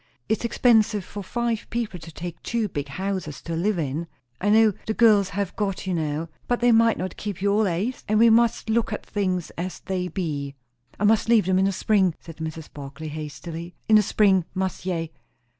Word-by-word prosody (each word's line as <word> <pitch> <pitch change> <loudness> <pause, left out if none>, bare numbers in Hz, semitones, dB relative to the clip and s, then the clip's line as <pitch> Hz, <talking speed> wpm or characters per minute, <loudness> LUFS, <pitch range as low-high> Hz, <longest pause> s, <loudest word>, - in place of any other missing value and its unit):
It's 220 +2 0
expensive 220 -4 +3
for 205 - -7
five 235 +2 -2
people 230 -6 -3
to 165 0 -11
take 170 +1 -7
two 230 -2 -1
big 145 -6 -4
houses 185 -1 -4
to 165 - -4
live 195 +4 0
in. 155 +1 -2 0.3
I 205 - +1
know, 220 0 +5
the 220 - -1
girls 210 -5 +5
have 200 -2 -3
got 195 -3 -2
you 190 - -1
now; 155 -1 -2 0.2
but 245 - +1
they 245 0 +4
might 230 0 +4
not 185 -1 -4
keep 205 -4 -5
you 200 +1 +2
allays; 210 +3 0
and 215 - +2
we 230 +1 +6
must 230 0 +3
look 225 +1 +1
at 210 - -4
things 185 -4 -2
as 180 +1 -4
they 185 -2 -2
be." 145 -7 -3 0.4
"I - - -2
must 220 +1 +3
leave 225 -5 +5
them 185 0 +2
in 190 - +3
the 195 - +2
spring," 190 -3 +2
said 165 -2 -12
Mrs. 160 -1 -6
Barclay 145 +2 -7
hastily. 155 +3 -7
"In 215 - +7
the - - +6
spring, 195 -2 +3
must 190 0 -2
ye!" 165 -3 -2
190 Hz, 205 wpm, -24 LUFS, 165-215 Hz, 0.4 s, In